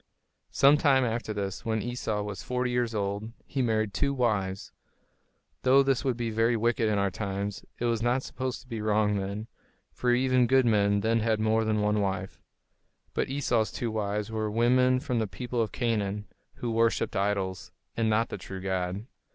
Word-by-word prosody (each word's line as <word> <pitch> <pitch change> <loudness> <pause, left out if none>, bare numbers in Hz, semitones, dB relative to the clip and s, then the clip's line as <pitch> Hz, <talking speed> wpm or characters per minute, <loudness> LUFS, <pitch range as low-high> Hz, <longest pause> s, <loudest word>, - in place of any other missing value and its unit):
Some 140 +2 +5
time 135 -3 +4
after 115 -1 -2
this, 100 -2 -4
when 110 -3 -1
Esau 115 -4 -2
was 105 -2 -5
forty 125 0 -1
years 120 -2 0
old, 100 +2 -2
he 135 - -2
married 110 -4 0
two 140 +7 0
wives. 100 -6 -1 0.9
Though 135 +2 +5
this 135 -2 +1
would 130 -4 0
be 115 -2 -2
very 115 +2 +2
wicked 115 0 +1
in 105 - +1
our 100 -1 +1
times, 100 0 -4
it 120 - -2
was 115 -2 +1
not 120 +3 +1
supposed 130 -1 -4
to - - -21
be 115 -3 -4
wrong 105 -1 +2
then; 100 +2 -3 0.5
for 125 - 0
even 125 0 +3
good 130 +1 +4
men 100 -2 +3
then 115 +2 +2
had 110 -1 +1
more 110 +1 +2
than 110 -1 +1
one 105 0 +2
wife. 95 -1 -3 0.7
But - - -1
Esau's 125 -5 0
two 120 -2 -3
wives 105 0 -2
were 110 -1 -1
women 125 +3 +3
from 125 -2 -1
the 110 - 0
people 120 +6 -3
of 110 - -1
Canaan, 105 -4 -1 0.3
who 120 - -3
worshipped 115 0 +1
idols, 100 -2 -1 0.2
and 115 -1 +1
not 110 +2 +2
the - - -5
true 95 +1 -7
God. 95 +2 -2
110 Hz, 185 wpm, -28 LUFS, 105-120 Hz, 0.9 s, Some